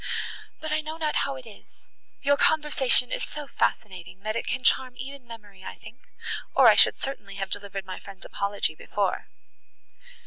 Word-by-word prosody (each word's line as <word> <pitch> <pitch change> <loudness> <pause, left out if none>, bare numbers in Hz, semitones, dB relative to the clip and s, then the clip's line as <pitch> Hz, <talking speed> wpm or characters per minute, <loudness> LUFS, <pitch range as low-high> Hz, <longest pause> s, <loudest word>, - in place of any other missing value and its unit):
But, 315 -1 -4
I 305 0 +2
know 310 +1 -6
not 310 -2 0
how 275 -1 0
it 260 -1 -10
is—your 275 +5 -4
conversation 285 -5 +4
is - - -1
so 300 0 -5
fascinating—that 200 -3 -2
it - - -2
can 255 +1 -2
charm 255 -1 +3
even 265 0 -8
memory, 205 -4 -12
I - - -7
think, 240 - -13 0.6
or - - +8
I - - +10
should - - +6
certainly 270 -7 -6
have 195 -1 -4
delivered 200 -1 -4
my 185 - -6
friend's 195 -1 -12
apology 200 -5 0
before." 195 +4 -2
235 Hz, 165 wpm, -27 LUFS, 200-275 Hz, 0.6 s, I